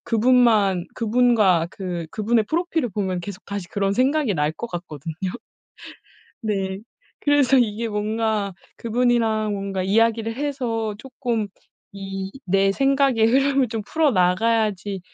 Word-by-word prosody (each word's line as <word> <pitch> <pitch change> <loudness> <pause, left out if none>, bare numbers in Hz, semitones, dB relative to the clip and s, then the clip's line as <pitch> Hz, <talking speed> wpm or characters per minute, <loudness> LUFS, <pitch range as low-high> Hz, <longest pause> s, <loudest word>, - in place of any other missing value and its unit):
그분만 225 -6 +3
그분과 220 -7 +3
그 180 -4 -5
그분의 220 +1 +1
프로필을 330 -4 0
보면 190 -2 -2
계속 185 +1 -8
다시 200 -3 -5
그런 195 -1 0
생각이 265 0 +1
날 150 -1 0
것 235 - -6
같거든요. 165 - -7 1.3
네. 195 -3 -2 0.4
그래서 285 -2 +4
이게 230 -1 0
뭔가 210 -1 -1 0.2
그 230 - -7
분이랑 225 -3 +1
뭔가 195 -1 -3
이야기를 225 +3 +1
해서 245 -6 -2
조금 235 -3 -3 0.4
이 195 -1 -6 0.2
내 195 +1 +3
생각의 270 -2 +3
흐름을 270 +2 +3
좀 225 0 -3
풀어 315 +4 +2
나가야지 200 +1 +1
220 Hz, 270 characters per minute, -22 LUFS, 195-245 Hz, 1.3 s, 그래서